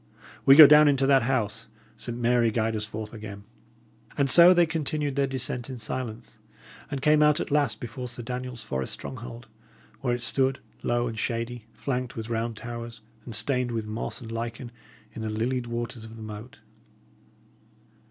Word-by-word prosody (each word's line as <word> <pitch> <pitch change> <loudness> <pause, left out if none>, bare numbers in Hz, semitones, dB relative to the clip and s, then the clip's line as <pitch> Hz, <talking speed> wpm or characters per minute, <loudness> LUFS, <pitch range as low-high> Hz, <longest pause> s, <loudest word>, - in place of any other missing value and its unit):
We 135 - +10
go 155 0 +12
down 150 +1 +8
into 135 -2 +3
that 135 -1 +5
house, 115 -2 -1 0.3
Saint 120 -1 -6
Mary 120 -1 +3
guide 110 0 0
us 105 0 -3
forth 105 +1 -7
again!" 105 -2 -8 0.7
And 140 -2 +3
so 175 +1 +9
they 175 -1 +5
continued 150 -3 -2
their 140 -1 +2
descent 130 -1 -3
in 130 - -6
silence, 115 0 -6 0.5
and 140 -2 -4
came 150 0 +5
out 150 +1 +4
at - - -4
last 145 -5 +1
before 125 +2 -6
Sir 120 0 -7
Daniel's 125 -1 -5
forest 65 -9 -4
stronghold, 120 -1 -8 0.5
where 125 -3 0
it 120 - -5
stood, 130 +3 +2 0.2
low 120 0 0
and 110 -2 -5
shady, 115 0 -3
flanked 125 -2 -3
with 115 +1 -6
round 115 -1 -2
towers 115 0 -7 0.2
and 115 - -5
stained 125 +3 +1
with 115 -2 -3
moss 110 +1 -4
and 115 -1 -8
lichen, 115 +1 -5 0.4
in 115 - -7
the 110 - -3
lilied 120 +3 -2
waters 120 0 -5
of 110 0 -10
the 110 - -9
moat. 110 +3 -9
120 Hz, 175 wpm, -26 LUFS, 115-135 Hz, 0.7 s, go